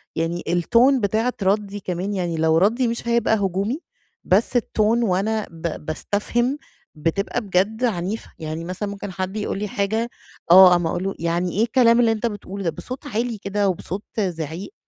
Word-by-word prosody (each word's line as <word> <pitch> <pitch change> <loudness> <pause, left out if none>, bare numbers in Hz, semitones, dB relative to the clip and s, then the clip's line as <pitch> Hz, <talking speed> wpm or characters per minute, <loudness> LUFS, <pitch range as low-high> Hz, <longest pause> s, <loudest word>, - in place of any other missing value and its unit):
يعني 165 +2 -2
الTone 235 +10 +4
بتاعة 220 +5 +1
ردِّي 205 +1 0
كمان، 185 +1 -3
يعني 175 -4 -2
لو 160 0 +3
ردّي 230 +8 +3
مش 235 0 -3
هيبقى 235 -1 +3
هجومي، 200 - -1 0.4
بس 210 +6 +2
الTone 235 - -3 0.2
وأنا 210 +2 0
ب 165 -2 -5
باستفهم 240 - -1 0.4
بتبقى 170 +9 -1
بجد 205 +3 0
عنيفة، 205 -2 -2
يعني 160 +1 -5
مثلًا 185 +4 -4
ممكن 200 -1 -6
حد 185 +3 -4
يقول 205 -2 -2
لي 210 - -2
حاجة 220 +4 -1 0.4
آه، 185 0 +10
أقوم 175 -2 +3
أقول 175 +2 -2
له 195 0 -1
يعني 170 +2 0
إيه 205 +6 +1
الكلام 235 0 +4
اللّي 230 -2 +4
أنت 220 +1 -2
بتقوله 200 -3 -4
ده! 170 - +1
بصوت 255 - -7
عالي 230 +1 -2
كده، 200 0 0
وبصوت 190 +2 -4 0.2
زِعيق، 175 - -3
200 Hz, 170 wpm, -22 LUFS, 175-225 Hz, 0.4 s, آه